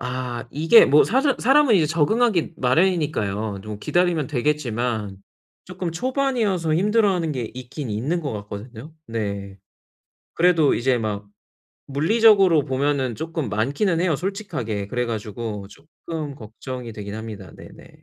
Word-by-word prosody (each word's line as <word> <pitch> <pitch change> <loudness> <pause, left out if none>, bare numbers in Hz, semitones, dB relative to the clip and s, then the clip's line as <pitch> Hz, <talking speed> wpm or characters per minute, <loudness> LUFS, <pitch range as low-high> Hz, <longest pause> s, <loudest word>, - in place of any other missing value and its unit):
아 125 -1 -4
이게 165 +10 +6
뭐 150 +2 +5
사서 265 +4 +2
사람은 270 -1 +5
이제 160 - +3
적응하기 170 +3 +1
마련이니까요. 125 - 0
좀 105 -1 -6
기다리면 175 -3 +1
되겠지만 120 -7 -1 0.5
쪼끔 180 -1 -5
초반이어서 225 - 0
힘들어하는 195 -3 +2
게 120 -4 -4
있긴 130 +1 -7
있는 140 +12 -1
것 145 -6 -4
같거든요. 110 +7 -8
네 100 -3 -4 0.8
그래도 165 -4 +4
이제 125 +1 +1
막 105 -2 -4 0.6
물리적으로 190 +1 +4
보면은 135 -2 0
쪼끔 160 -5 -4
많기는 140 - 0
해요 175 -3 +2
솔직하게. 150 - -4
그래가지고 110 -3 -4
쪼끔 150 +2 -8
걱정이 120 +1 -8
되긴 100 -1 -7
합니다. 110 -5 -8
네네. - - -14
140 Hz, 315 characters per minute, -22 LUFS, 115-175 Hz, 0.8 s, 이게